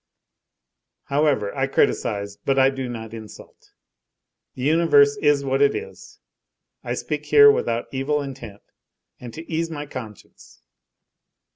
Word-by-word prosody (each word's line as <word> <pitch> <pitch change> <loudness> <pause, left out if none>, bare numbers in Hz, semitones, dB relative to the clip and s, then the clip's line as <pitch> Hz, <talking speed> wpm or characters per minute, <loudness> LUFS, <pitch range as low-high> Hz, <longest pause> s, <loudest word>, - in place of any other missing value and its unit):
However, 140 -8 +1
I - - 0
criticise, 100 0 0
but 135 -1 -1
I 135 0 +5
do 135 -2 -5
not 110 -2 -7
insult. 110 -2 -12 0.9
The 125 - -6
universe 145 -2 +4
is 145 -1 +2
what 135 +1 0
it 140 - +3
is. 460 +2 -9 0.7
I - - -3
speak - - -5
here 430 0 +8
without 115 - -1
evil 140 +3 -1
intent 130 -7 -8 0.6
and 120 -2 -9
to 160 +1 -9
ease 165 +1 -2
my 150 -2 -6
conscience. 115 - -11
135 Hz, 130 wpm, -22 LUFS, 115-150 Hz, 0.9 s, here